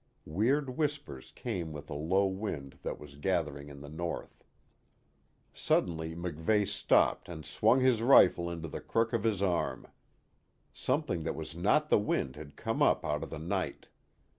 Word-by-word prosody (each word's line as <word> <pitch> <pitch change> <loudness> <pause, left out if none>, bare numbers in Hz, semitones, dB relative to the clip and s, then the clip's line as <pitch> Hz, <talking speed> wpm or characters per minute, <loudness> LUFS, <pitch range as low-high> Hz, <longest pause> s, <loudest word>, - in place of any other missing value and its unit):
Weird 130 - +1
whispers 145 - -3
came 90 -9 -4
with 75 -1 -8
a - - -2
low 85 +7 +2
wind 95 -8 -4
that - - -4
was 70 -1 -12
gathering 75 -4 -1
in 70 -1 -11
the 75 - -9
north. 85 +3 -5 1.1
Suddenly 80 -2 0
MacVeigh 85 +4 0
stopped - - +2
and 80 -3 -7
swung 130 +2 +3
his 130 -3 +3
rifle 90 -8 +6
into 85 -1 -5
the - - -6
crook 115 +1 0
of 115 - +1
his 105 -4 +1
arm. 90 -3 0 0.9
Something 130 - -1
that 80 - -3
was 80 0 -6
not 110 - +2
the - - +5
wind 70 -10 -1
had 75 -1 -10
come - - -2
up - - +3
out 75 0 -1
of - - -5
the 80 - -6
night. 85 -1 -3
85 Hz, 165 wpm, -31 LUFS, 75-110 Hz, 1.1 s, rifle